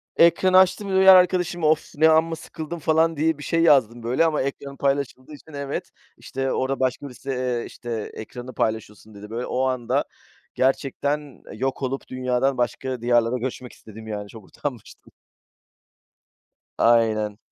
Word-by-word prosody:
Ekranı 185 Hz, +2 st, +5 dB
açtım, 190 Hz, +2 st, +3 dB
diğer 190 Hz, 0 st, +8 dB
arkadaşıma, 180 Hz, -3 st, +2 dB
"Of! 155 Hz, 0 st, +1 dB
Ne 160 Hz, +2 st, +5 dB
amma 160 Hz, +1 st, +3 dB
sıkıldım." 160 Hz, +1 st, -7 dB
falan 160 Hz, +1 st, +2 dB
diye 160 Hz, 0 st, +1 dB
bir 145 Hz, -, -9 dB
şey 165 Hz, +2 st, 0 dB
yazdım 120 Hz, -7 st, +3 dB
böyle 125 Hz, +7 st, +2 dB
ama 160 Hz, -2 st, +1 dB
ekranım 140 Hz, 0 st, -5 dB
paylaşıldığı 140 Hz, 0 st, -2 dB
için 150 Hz, +1 st, -14 dB
Evet, 140 Hz, 0 st, -4 dB, 0.3 s
işte, 135 Hz, 0 st, -3 dB
orada 135 Hz, +1 st, -1 dB
başka 130 Hz, +2 st, -1 dB
birisi, 135 Hz, +2 st, -11 dB
eee, 125 Hz, -2 st, -1 dB
işte, 115 Hz, -3 st, -6 dB
"Ekranı 125 Hz, +3 st, -9 dB
paylaşıyorsun." 110 Hz, -1 st, -3 dB
dedi. 105 Hz, +1 st, -11 dB
Böyle, 115 Hz, +3 st, -4 dB
o 125 Hz, -, -1 dB
anda 130 Hz, -3 st, 0 dB, 0.5 s
gerçekten 140 Hz, +1 st, -1 dB
yok 130 Hz, +5 st, -3 dB
olup 135 Hz, +1 st, -3 dB
dünyadan 130 Hz, +1 st, 0 dB
başka 125 Hz, +1 st, -2 dB
diyarlara 120 Hz, 0 st, +2 dB
göçmek 125 Hz, 0 st, -5 dB
istedim, 110 Hz, 0 st, -13 dB
yani. 105 Hz, -1 st, -5 dB
Çok 110 Hz, -2 st, -12 dB
utanmıştım. 125 Hz, -2 st, -8 dB, 1.7 s
Aynen. 110 Hz, -3 st, +2 dB
130 Hz, 145 wpm, -23 LUFS, 120-155 Hz, 1.7 s, diğer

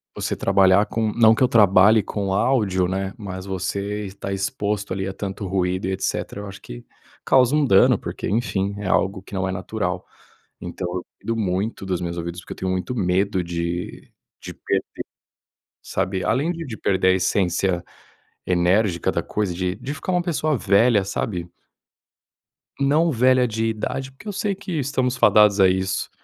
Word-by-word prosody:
você -, -, -2 dB
trabalhar 95 Hz, +1 st, +4 dB
com 110 Hz, -1 st, -1 dB
não 110 Hz, -1 st, +5 dB
que -, -, +1 dB
eu 125 Hz, -, +5 dB
trabalhe 105 Hz, -1 st, +5 dB
com 100 Hz, -1 st, -3 dB
áudio, 100 Hz, -6 st, +2 dB
né, 95 Hz, +1 st, -3 dB
mas 95 Hz, -4 st, -7 dB
você 100 Hz, +2 st, -3 dB
está 100 Hz, 0 st, -6 dB
exposto 100 Hz, +1 st, -2 dB
ali 95 Hz, 0 st, -3 dB
a 95 Hz, -, -4 dB
tanto 100 Hz, +1 st, -5 dB
ruído 90 Hz, 0 st, -1 dB
e -, -, -1 dB
etc. 95 Hz, -, -2 dB
Eu 105 Hz, -, -7 dB
acho 100 Hz, 0 st, -9 dB
que -, -, -10 dB, 0.4 s
causa 130 Hz, +1 st, +4 dB
um 150 Hz, -, +3 dB
dano, 95 Hz, -7 st, +5 dB
porque, -, -, -5 dB
enfim, 100 Hz, -3 st, -1 dB
é 105 Hz, -, -4 dB
algo 95 Hz, +1 st, +1 dB
que 100 Hz, -, -16 dB
não 95 Hz, 0 st, -1 dB
é -, -, -2 dB
natural, 90 Hz, -1 st, -3 dB, 0.6 s
então 90 Hz, +1 st, -5 dB
eu 90 Hz, -1 st, -3 dB, 0.2 s
cuido 115 Hz, -, -3 dB
muito 100 Hz, 0 st, -2 dB
dos 90 Hz, -2 st, -1 dB
meus 85 Hz, -1 st, -4 dB
ouvidos, 85 Hz, +1 st, -5 dB
porque -, -, -8 dB
eu -, -, -19 dB
tenho 95 Hz, 0 st, -2 dB
muito 95 Hz, +6 st, -2 dB
medo 95 Hz, -1 st, +1 dB
de 85 Hz, +1 st, -4 dB, 0.3 s
de -, -, -8 dB
perder, -, -, -3 dB, 0.8 s
sabe, 95 Hz, 0 st, -2 dB
além 140 Hz, +9 st, +1 dB
de 165 Hz, -1 st, -6 dB
de 120 Hz, -6 st, -6 dB
perder 95 Hz, -1 st, +1 dB
a -, -, +6 dB
essência 90 Hz, -1 st, 0 dB, 0.6 s
enérgica 90 Hz, +1 st, +2 dB
da -, -, -1 dB
coisa, 105 Hz, -4 st, -2 dB
de 90 Hz, +1 st, -2 dB
de 140 Hz, -, -6 dB
ficar 185 Hz, +4 st, -4 dB
uma 180 Hz, -1 st, +2 dB
pessoa 155 Hz, -4 st, 0 dB
velha, 105 Hz, 0 st, +3 dB
sabe. 90 Hz, -3 st, -3 dB, 1.3 s
Não 150 Hz, +4 st, +3 dB
velha 125 Hz, 0 st, +3 dB
de 110 Hz, 0 st, -2 dB
idade, 130 Hz, +4 st, -3 dB
porque 135 Hz, +11 st, -15 dB
eu 205 Hz, -, -3 dB
sei 200 Hz, +1 st, -1 dB
que 195 Hz, -1 st, -8 dB
estamos 130 Hz, -2 st, 0 dB
fadados 105 Hz, -3 st, +5 dB
a 95 Hz, -, +7 dB
isso. 95 Hz, +1 st, -1 dB
100 Hz, 180 wpm, -22 LUFS, 95-115 Hz, 1.3 s, a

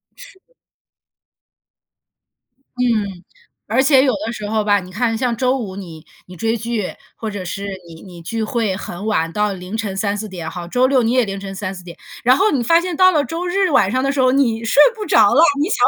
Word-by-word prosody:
是。 -, -, -15 dB, 2.4 s
嗯， 210 Hz, -7 st, -1 dB, 0.4 s
而 235 Hz, +5 st, +2 dB
且 265 Hz, -1 st, +5 dB
有 260 Hz, -3 st, +2 dB
的 230 Hz, -, -4 dB
时 210 Hz, -3 st, -6 dB
候 220 Hz, 0 st, +1 dB
吧， 205 Hz, -1 st, +3 dB
你 180 Hz, -, -12 dB
看 225 Hz, +3 st, -1 dB
像 240 Hz, 0 st, -1 dB
周 255 Hz, +3 st, +1 dB
五 200 Hz, -7 st, -6 dB
你 165 Hz, -5 st, -10 dB, 0.2 s
你 180 Hz, -, -11 dB
追 225 Hz, +6 st, -1 dB
剧， 225 Hz, -3 st, -3 dB, 0.2 s
或 220 Hz, -2 st, -5 dB
者 200 Hz, -2 st, -6 dB
是 200 Hz, +3 st, -5 dB, 0.2 s
你 165 Hz, -1 st, -12 dB
你 175 Hz, -3 st, -12 dB
聚 220 Hz, +7 st, -3 dB
会 220 Hz, -4 st, -1 dB
很 185 Hz, 0 st, -7 dB
晚 165 Hz, -7 st, 0 dB
到 210 Hz, +1 st, 0 dB
凌 185 Hz, +3 st, -6 dB
晨 210 Hz, -4 st, -3 dB
3-4 205 Hz, +1 st, -2 dB
点， 175 Hz, -5 st, -6 dB
好， 175 Hz, -1 st, -7 dB
周 250 Hz, +8 st, +2 dB
六 260 Hz, -1 st, +3 dB
你 230 Hz, 0 st, +1 dB
也 255 Hz, -1 st, +3 dB
凌 195 Hz, -2 st, -5 dB
晨 195 Hz, 0 st, -7 dB
3-4 190 Hz, -2 st, -6 dB
点， 170 Hz, -1 st, -11 dB, 0.3 s
然 250 Hz, +2 st, +5 dB
后 410 Hz, +9 st, +2 dB
你 270 Hz, -, 0 dB
发 330 Hz, +8 st, +4 dB
现 360 Hz, -1 st, -4 dB
到 370 Hz, 0 st, +6 dB
了 300 Hz, -4 st, +2 dB
周 330 Hz, +6 st, -4 dB
日 380 Hz, +1 st, +1 dB
晚 195 Hz, -9 st, +3 dB
上 255 Hz, +4 st, 0 dB
的 275 Hz, -, +1 dB
时 280 Hz, -, -3 dB
候， 255 Hz, 0 st, +4 dB
你 230 Hz, -5 st, +1 dB
睡 255 Hz, +6 st, +4 dB
不 430 Hz, -2 st, -5 dB
着 220 Hz, -, +4 dB
了， 290 Hz, -, +5 dB, 0.2 s
你 315 Hz, -, 0 dB
想， -, -, +3 dB
225 Hz, 225 characters per minute, -19 LUFS, 195-260 Hz, 2.4 s, 到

